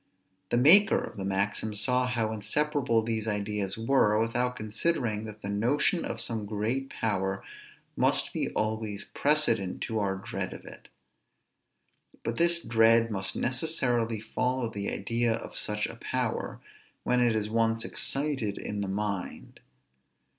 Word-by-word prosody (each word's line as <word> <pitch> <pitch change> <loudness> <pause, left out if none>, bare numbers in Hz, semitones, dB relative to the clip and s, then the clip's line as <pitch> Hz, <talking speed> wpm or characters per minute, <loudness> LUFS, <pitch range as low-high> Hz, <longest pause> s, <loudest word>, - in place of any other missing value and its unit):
The - - +2
maker 190 - +7
of - - -7
the 95 - -4
maxim 100 +2 -1
saw 125 +4 +1
how 115 -3 0
inseparable 115 +2 0
these 110 -1 -2
ideas 105 -2 -2
were, 115 -3 +3
without 120 +2 0
considering 110 0 -1
that 110 -1 -9
the - - -3
notion 120 - +1
of - - -4
some 110 -3 -1
great 115 +6 -2
power 95 -3 -1 0.5
must - - +1
be - - -1
always 110 -1 -2
precedent 115 -11 +2
to 110 -1 -2
our 100 -2 0
dread 95 - -5
of - - -12
it. - - -12 1.4
But 115 - -3
this 170 0 +3
dread 115 0 +4
must 95 -2 -1
necessarily 125 -4 0
follow 125 +2 -1
the 100 -1 -3
idea 115 +3 0
of - - -8
such 105 0 +1
a - - -7
power, - - -2 0.4
when 125 0 +2
it 120 -2 +3
is 105 -1 0
once 115 0 +1
excited 135 -8 0
in 105 -1 -4
the 100 - -2
mind. 100 -1 -4
115 Hz, 145 wpm, -28 LUFS, 105-125 Hz, 1.4 s, maker